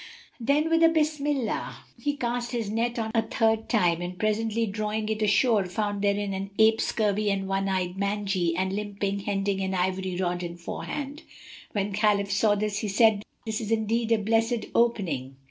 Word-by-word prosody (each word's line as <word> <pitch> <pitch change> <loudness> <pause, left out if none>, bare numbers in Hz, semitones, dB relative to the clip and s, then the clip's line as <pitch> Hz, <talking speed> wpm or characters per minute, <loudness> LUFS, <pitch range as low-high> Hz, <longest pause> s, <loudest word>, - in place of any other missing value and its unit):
Then 280 +6 +2
with 330 0 +4
a 330 - +7
Bismillah 295 -5 -1 0.2
he 290 0 -1
cast 240 -1 -2
his 225 -4 -2
net 235 +2 -1
a 225 0 0
third 225 0 0
time, 175 -7 +2
and 180 +1 -5
presently 220 +2 0
drawing 215 +1 -2
it 220 0 -2
ashore 215 0 +3
found 205 +2 -2
therein 200 0 0
an 195 +1 -4
ape 220 0 +5
scurvy 210 -1 +1
and 195 -1 -1
one 195 0 0
eyed, 185 0 -1
mangy, 200 -4 0
and 190 +1 -1
limping 200 -1 -2
hending 195 -1 -1
an 190 0 -1
ivory 185 0 -1
rod 175 -1 -1
in 175 -1 -5
forehand. 280 - -5 0.5
When 205 -1 -1
Khalif 205 -1 +2
saw 205 +1 +3
this, 205 0 -1
he 215 - -2
said, 210 0 +4 0.2
"This 220 +1 -2
is 215 - -4
indeed 225 +1 0
a 225 - +5
blessed 225 +2 +1
opening! 185 - 0
210 Hz, 175 wpm, -27 LUFS, 195-225 Hz, 0.5 s, a